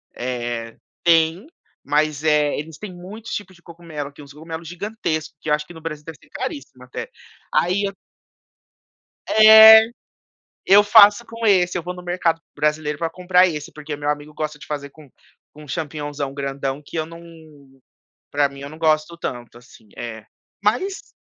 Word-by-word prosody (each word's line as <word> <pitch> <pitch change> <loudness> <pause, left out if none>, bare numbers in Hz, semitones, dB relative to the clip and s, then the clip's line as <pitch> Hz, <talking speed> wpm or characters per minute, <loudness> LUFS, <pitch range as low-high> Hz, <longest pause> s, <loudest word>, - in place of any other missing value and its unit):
Eh, 120 -2 -4 0.3
tem, 165 - +3 0.4
mas 150 0 0
é 150 -1 +2
eles 155 0 -8
tem 210 -3 -8
muitos 195 +6 -10
tipos 195 -2 -6
de 175 - -22
cogumelo, 165 -4 -8
tem 145 +1 -14
uns 140 - -14
cogumelos 160 +2 -8
gigantescos, 170 -4 -4
que 155 - -5
eu - - +3
acho 150 0 -1
que 175 - -13
no 160 - -12
Brasil 155 -2 -6
deve 165 -2 -9
ser - - -22
caríssimos 130 -2 -7
até. - - -7 0.4
Aí 185 +4 +2
eu 195 - -3 1.4
É. 220 0 +9 0.8
Eu 205 +2 +7
faço 210 +1 +7
com 230 0 -4
esse, 180 -4 +3
eu - - -5
vou 180 +2 -5
no 180 - -10
mercado 175 -2 0
brasileiro 150 -1 -1
pra 165 - -1
comprar 180 0 +3
esse, 150 -3 -6
porque 150 -1 -7
meu 145 0 -4
amigo 150 +1 -5
gosta 155 -1 -4
de - - -13
fazer 145 -1 -5
com 150 0 -17 0.4
com 150 0 -13
champignonzão 145 -1 -4
grandão, 140 0 -4
que - - -9
eu 160 - 0
não 165 +1 -11 1.1
pra 145 -1 +2
mim 140 0 -12
eu 140 - -7
não 155 +2 -12
gosto 155 +1 +1
tanto, 120 -6 -6
assim. 115 -3 -20
É, 110 -2 -7 0.4
mas 310 - -1
155 Hz, 170 wpm, -21 LUFS, 145-180 Hz, 1.4 s, É